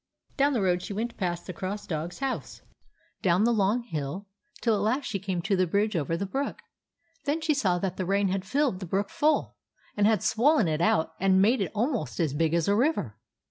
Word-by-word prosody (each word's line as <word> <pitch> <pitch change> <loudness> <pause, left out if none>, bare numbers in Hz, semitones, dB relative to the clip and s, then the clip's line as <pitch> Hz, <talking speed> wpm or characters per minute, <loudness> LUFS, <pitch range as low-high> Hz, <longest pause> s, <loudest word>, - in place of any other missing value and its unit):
Down 285 +1 +3
the 230 -6 +1
road 180 -1 +2
she 200 - -6
went 230 +3 -3
past 175 -3 -3
the 185 - -6
Cross 195 +4 -5
Dog's 165 +1 -4
house, 270 -1 -4 0.6
down 180 +2 +3
the 235 +1 +3
long 215 +3 +1
hill, 160 - -4 0.3
till 230 - +2
at 205 - 0
last 250 +7 0
she 200 - -2
came 185 -3 -3
to 200 +1 +1
the 185 -1 +2
bridge 205 +4 +1
over 165 +1 0
the 200 - -2
brook. 270 +9 -3 0.7
Then 290 +3 0
she 315 -1 +1
saw 195 -11 +1
that 185 0 -3
the 185 - -2
rain 200 0 +2
had 190 0 -1
filled 265 -2 0
the 185 - -6
brook 195 +3 -1
full, 305 +1 +1 0.4
and 205 0 +3
had 215 -4 +2
swollen 250 - +3
it 155 0 -1
out 160 -2 +2
and 190 0 +4
made 220 +4 +4
it 195 - -1
almost 235 0 -1
as 160 -5 +1
big 165 +2 +1
as 170 -2 +1
a 200 - +3
river. 235 - 0
200 Hz, 220 wpm, -27 LUFS, 180-235 Hz, 0.7 s, and